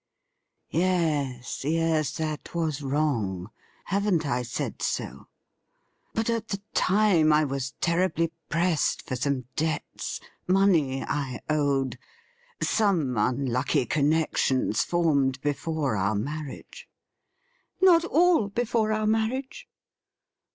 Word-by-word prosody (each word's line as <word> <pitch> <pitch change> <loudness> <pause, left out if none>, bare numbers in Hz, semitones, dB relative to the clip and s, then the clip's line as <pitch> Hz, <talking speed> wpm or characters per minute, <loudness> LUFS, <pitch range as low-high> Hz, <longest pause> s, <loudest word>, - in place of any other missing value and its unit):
' - - -55 0.3
Yes, 155 -9 0
yes, 155 -2 +1
that 155 0 -4
was 155 -4 -1
wrong; 120 -10 -1 0.3
haven't 195 -5 +1
I 125 -3 0
said 120 - -4
so? 70 - -3 0.9
But 225 0 0
at 230 -1 -1
the 200 - -3
time 185 -6 +4
I 150 +1 +4
was 135 -2 -3
ten 170 0 +2
ibly 165 -1 -1 0.2
pressed 170 -1 +1
for 130 - -4
some 130 0 -1
debts 155 0 -3
— - - -41
money 175 -9 +3
I 135 -4 -3
owed 140 -3 0 0.4
— 485 0 -34 0.2
some 170 - +2
unlucky 125 +3 +1
connections 145 -5 +1
formed 140 -6 +1
before 145 -2 -1
our 100 +2 0
marriage.' 145 +6 -6 0.5
' - - -43
Not 340 -3 +7
all 345 - +3
before 220 +1 0
our 215 0 0
marriage.' 255 - -1
155 Hz, 115 wpm, -26 LUFS, 135-195 Hz, 0.9 s, Not